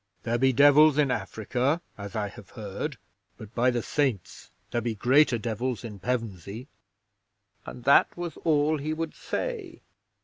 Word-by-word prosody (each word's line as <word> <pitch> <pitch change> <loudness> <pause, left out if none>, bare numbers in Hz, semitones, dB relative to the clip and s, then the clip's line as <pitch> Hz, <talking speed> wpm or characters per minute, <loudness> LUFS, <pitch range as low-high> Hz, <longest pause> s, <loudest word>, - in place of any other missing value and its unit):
There 120 0 0
be 135 +1 +4
devils 145 +3 +6
in 145 -3 +3
Africa, 125 - -1 0.2
as 100 -1 -8
I 105 -1 -1
have - - -13
heard, - - -5 0.4
but 110 +1 -11
by 125 +2 +3
the 120 -2 -1
Saints, 125 -11 -2 0.2
there 120 - 0
be 115 -1 -2
greater 130 +4 +4
devils 120 +2 -3
in 105 -4 -8
Pevensey!" 115 - -4 1.0
And 125 - -8
that 140 +6 +4
was 175 -3 -5
all 155 -1 +2
he 155 +3 -2
would 165 0 -4
say. 435 -9 -5
125 Hz, 150 wpm, -27 LUFS, 110-150 Hz, 1.0 s, devils